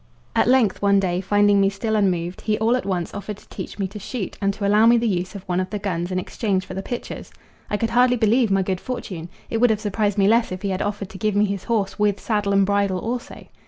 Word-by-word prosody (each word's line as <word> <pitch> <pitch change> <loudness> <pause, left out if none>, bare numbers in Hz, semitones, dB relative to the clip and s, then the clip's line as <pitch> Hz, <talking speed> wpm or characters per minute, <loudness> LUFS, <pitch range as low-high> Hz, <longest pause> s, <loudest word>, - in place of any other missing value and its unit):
At - - +3
length 245 -6 +3
one 200 -1 +4
day, 180 -2 0
finding 205 +1 +3
me 195 - +4
still 220 +3 -2
unmoved, 180 -4 0
he 215 -1 0
all 225 +2 +2
at 250 - -3
once 180 -3 -2
offered 205 0 -6
to - - -19
teach - - -7
me 195 -2 -1
to 210 +2 -8
shoot 210 0 -5
and 200 0 +2
to 200 - -3
allow 210 +3 +5
me 235 +1 +6
the 235 0 +1
use 185 -1 -2
of 195 - -7
one 180 -2 -1
of 185 - -2
the 210 - -3
guns 180 -3 -3
in 185 - -1
exchange 190 0 -1
for - - -8
the 195 - -3
pictures. 240 +4 -6 0.4
I 210 - 0
could 225 +1 -1
hardly 250 +1 +4
believe 225 +1 +3
my 195 -1 +2
good 185 -1 -2
fortune: 185 -9 -5 0.2
it 225 - 0
would 245 +2 +4
have 215 -2 +1
surprised 210 -1 -1
me 195 -1 +4
less 230 0 +3
if 185 +1 -6
he 200 - -1
had 190 +1 -2
offered 205 -2 -3
to 190 - -10
give 215 -2 0
me 205 +1 +4
his 200 -2 -4
horse 215 -4 -1
with 205 -1 +2
"saddle 210 -2 -1
and 195 0 +4
bridle 200 -1 +1
also." 240 +6 -5
205 Hz, 270 wpm, -22 LUFS, 190-220 Hz, 0.4 s, me